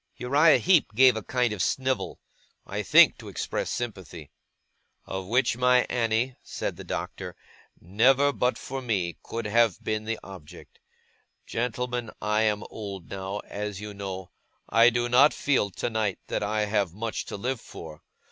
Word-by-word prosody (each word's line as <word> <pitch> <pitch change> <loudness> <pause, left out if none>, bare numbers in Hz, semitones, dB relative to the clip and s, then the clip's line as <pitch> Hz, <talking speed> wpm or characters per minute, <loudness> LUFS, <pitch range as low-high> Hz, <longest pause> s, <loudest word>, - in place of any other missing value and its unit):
Uriah 145 +5 +5
Heep 165 - +3
gave 130 0 +6
a 110 - -3
kind 125 +1 0
of 100 - -4
snivel. 130 +5 -1 0.5
I - - -3
think - - +6
to - - -10
express - - -3
sympathy. 95 -10 -6 0.7
'Of 95 -1 -5
which 120 +2 +2
my 125 0 +4
Annie,' 120 +1 0
said - - -4
the - - -9
Doctor, - - -5 0.4
'never, 130 - +3
but 125 -1 0
for 135 0 -6
me, 95 -8 -2
could 115 -1 -5
have 110 -2 +2
been 110 0 -2
the 115 +1 -2
object. 90 -3 -12 0.7
Gentlemen, 125 0 -2
I 105 +1 +1
am 105 -1 +1
old 100 -5 -7
now, 95 +1 -4
as 105 -1 -5
you 105 0 -7
know; 95 -2 -6 0.4
I 115 +1 +6
do 120 0 0
not 130 +5 +5
feel, 135 -8 +1
tonight, 110 0 -2
that - - -1
I 105 +1 0
have 100 -4 0
much 115 +1 -3
to - - -6
live 125 +3 -3
for. 80 -2 -10
110 Hz, 155 wpm, -27 LUFS, 100-125 Hz, 0.7 s, gave